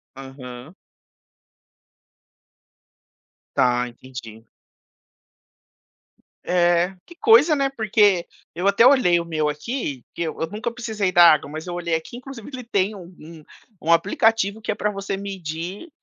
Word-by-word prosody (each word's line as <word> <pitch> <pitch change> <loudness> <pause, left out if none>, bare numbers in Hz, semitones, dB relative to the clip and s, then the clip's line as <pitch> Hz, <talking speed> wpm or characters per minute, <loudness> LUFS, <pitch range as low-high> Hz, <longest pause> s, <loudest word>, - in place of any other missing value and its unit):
Aham. 135 +3 -10 2.8
Tá, 125 -2 +2
entendi. 120 -2 -11 2.0
É. 175 +1 +2
Que 345 - -15
coisa, 345 -7 +5
né, 275 -1 +1
porque 210 -7 +2 0.3
eu 180 +3 -1
até 200 +4 +5
olhei 215 -11 +4
o 170 - -4
meu 155 -2 -1
aqui, 150 - -4
que - - -6
eu 160 - -5
eu 165 - 0
nunca 225 +4 -4
precisei 220 -5 -2
da 175 -2 +8
água, 145 -2 +1
mas 155 +3 -7
eu 175 - -4
olhei 170 -1 -3
aqui, 160 +9 -6
inclusive 255 -2 -10
que 260 - -7
ele 250 - -7
tem 200 +1 0
um 180 -1 -12
um 160 0 -12 0.4
um 165 - 0
aplicativo 205 +4 +2
que 215 - -2
é - - -3
pra 210 - -1
você 195 -1 -4
medir 190 - -6
180 Hz, 140 wpm, -22 LUFS, 155-215 Hz, 2.8 s, da